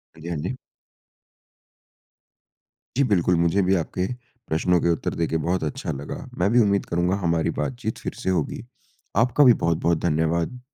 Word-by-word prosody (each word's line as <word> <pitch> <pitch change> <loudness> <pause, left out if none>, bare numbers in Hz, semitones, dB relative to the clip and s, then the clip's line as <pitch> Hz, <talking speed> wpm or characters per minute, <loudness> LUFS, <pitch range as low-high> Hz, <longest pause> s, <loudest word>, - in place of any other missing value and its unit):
हाँ 80 - -15
जी, 85 - -6
हाँ 85 - -2
जी। 90 +12 -4 2.4
जी 140 - +4
बिल्कुल। 90 -7 +2
मुझे 85 +4 +2
भी 95 +1 +3
आपके 90 +1 -1 0.4
प्रश्नों 85 +3 +2
के 85 - +2
उत्तर 85 - -1
दे 85 - 0
के 80 - 0
बहुत 90 0 0
अच्छा 75 - -3
लगा। 70 +1 -6 0.2
मैं 90 +3 +3
भी 120 - +5
उम्मीद 100 -3 +2
करूँगा 90 +2 0
हमारी 85 -1 +1
बातचीत 120 -4 -3
फ़िर - - -5
से - - 0
होगी। 75 - -4 0.6
आपका 125 +4 +3
भी 125 -3 +8
बहुत-बहुत 85 0 +1
धन्यवाद। 80 +8 0
85 Hz, 170 wpm, -24 LUFS, 80-100 Hz, 2.4 s, भी